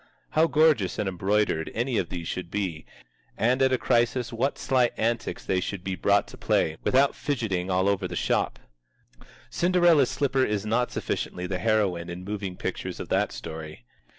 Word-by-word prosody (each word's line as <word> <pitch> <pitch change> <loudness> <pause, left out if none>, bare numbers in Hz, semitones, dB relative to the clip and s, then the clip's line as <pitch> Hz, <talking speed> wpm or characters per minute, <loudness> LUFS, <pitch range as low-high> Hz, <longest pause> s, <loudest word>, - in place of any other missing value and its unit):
How 160 +1 +4
gorgeous 150 - +3
and 105 - -1
embroidered 95 -2 0
any 120 0 0
of 85 - -2
these 85 -2 -5
should 90 -2 -4
be, 90 -5 -3 0.5
and 125 +4 +2
at 130 0 +4
a 130 - +3
crisis 120 0 +1
what 120 +5 0
sly 125 -3 +2
antics 115 +1 -1
they 95 - +1
should 95 0 -4
be 95 - -2
brought 100 +3 +2
to - - -11
play, 80 0 +1
without 135 +2 +3
fidgeting 110 -10 -2
all 95 +1 +2
over 100 -2 +1
the - - -6
shop! - - 0 0.9
Cinderella's 175 -6 +4
Slipper 135 -2 +1
is 105 -3 -1
not 120 +3 +1
sufficiently 90 - -3
the 90 0 -3
heroine 100 -6 +1
in 90 +1 -6
moving 100 -2 -5
pictures - - -4
of - - -6
that - - +1
story. 80 -5 -8
105 Hz, 175 wpm, -26 LUFS, 90-125 Hz, 0.9 s, How